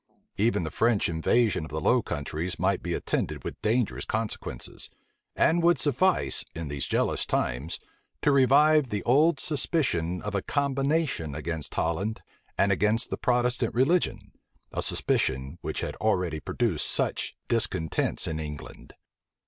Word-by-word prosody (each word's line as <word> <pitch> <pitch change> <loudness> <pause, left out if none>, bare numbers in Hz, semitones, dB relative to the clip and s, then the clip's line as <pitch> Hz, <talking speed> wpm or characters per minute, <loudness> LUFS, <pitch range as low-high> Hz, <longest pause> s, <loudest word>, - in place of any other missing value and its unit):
Even 110 -3 +2
the 80 - -4
French 115 -2 +2
invasion 90 +4 +1
of 75 - -8
the 75 +3 -3
Low - - +3
Countries 75 +5 -3
might 95 0 +1
be 85 -1 -2
attended - - -2
with - - -7
dangerous 115 +1 0
consequences; 110 0 -4 0.5
and 170 +2 +3
would 170 +1 +4
suffice, 155 +6 +3
in 80 -3 -5
these 70 -1 -3
jealous - - 0
times, 70 +8 -2 0.5
to 145 - +4
revive 140 +1 +5
the 105 -2 -3
old 145 +5 +4
suspicion 125 - 0
of 105 - -4
a 100 - 0
combination 140 - 0
against 80 -1 -5
Holland, 90 +7 -1 0.3
and 100 - +3
against 105 +4 +1
the - - -2
Protestant 125 -1 +1
religion, 155 +9 +1 0.4
a - - -2
suspicion 65 +5 0
which - - -4
had - - -4
already 90 -7 0
produced - - -1
such - - -1
discontents 80 -1 0
in 80 0 -3
England. 75 -2 -8
105 Hz, 140 wpm, -27 LUFS, 80-135 Hz, 0.5 s, revive